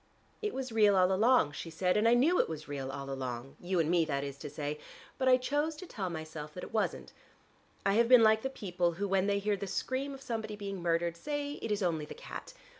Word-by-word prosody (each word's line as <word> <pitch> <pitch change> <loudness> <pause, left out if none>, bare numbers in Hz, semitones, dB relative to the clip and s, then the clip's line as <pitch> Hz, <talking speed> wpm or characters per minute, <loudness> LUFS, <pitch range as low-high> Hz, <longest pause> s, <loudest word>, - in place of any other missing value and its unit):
"It 425 -1 -1
was 260 -2 -4
real 210 -3 +5
all 185 0 +4
along," 220 - +4
she 155 +3 -6
said, 180 +3 0
"and 215 +2 +3
I 235 - +6
knew 310 +9 +4
it - - +2
was 155 -1 -6
real 135 -2 -4
all 140 0 -6
along 130 -1 -5
you 180 0 -1
and 160 - +2
me, 175 -2 +4
that 140 -2 -1
is 140 -1 -5
to 150 - -6
say 150 +1 -4 0.4
but 260 - +1
I 255 0 +7
chose 290 +5 -1
to 370 - -9
tell 195 - -4
myself 155 -2 -7
that 180 - -6
it - - -9
wasn't. 220 - -1 0.7
I 195 - +3
have 230 +2 +3
been 250 -3 +8
like 220 0 +5
the 265 - -2
people 180 -8 -1
who 200 +4 -2
when 195 0 +2
they 200 0 +2
hear 205 +1 0
the 200 - -5
scream 265 +7 -2
of 270 - -12
somebody 220 -3 -4
being 200 -2 -5
murdered 170 0 +1
say 290 - -4
it 225 - -3
is 205 -1 0
only 160 -4 0
the - - -9
cat. - - -9
195 Hz, 250 wpm, -32 LUFS, 160-235 Hz, 0.7 s, been